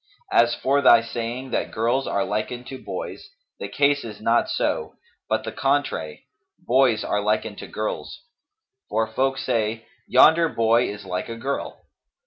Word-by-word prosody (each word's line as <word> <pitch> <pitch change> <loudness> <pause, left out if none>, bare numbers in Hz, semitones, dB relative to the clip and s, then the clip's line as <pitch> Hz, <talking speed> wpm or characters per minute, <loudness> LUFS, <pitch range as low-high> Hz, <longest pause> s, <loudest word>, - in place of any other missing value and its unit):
As 120 0 +4
for 140 +2 +1
thy 120 -3 +7
saying 120 +3 -5
that - - -1
girls 120 +5 0
are 100 - 0
likened 120 +4 -3
to 130 - -8
boys, 95 -2 -6 0.3
the - - -4
case 145 0 +2
is 110 -2 -8
not 115 +2 +2
so, - - -1 0.3
but - - 0
the - - -5
contrary: - - -1 0.3
boys 125 -3 +2
are 105 - 0
likened 105 0 -1
to - - -8
girls; 110 0 -5 0.7
for 110 - +1
folk 135 +4 -1
say, 115 -3 -1 0.2
Yonder 160 +5 +6
boy 115 0 +2
is 105 0 -8
like 90 +4 -4
a 115 - -5
girl. 135 +4 -4
115 Hz, 155 wpm, -23 LUFS, 110-130 Hz, 0.7 s, thy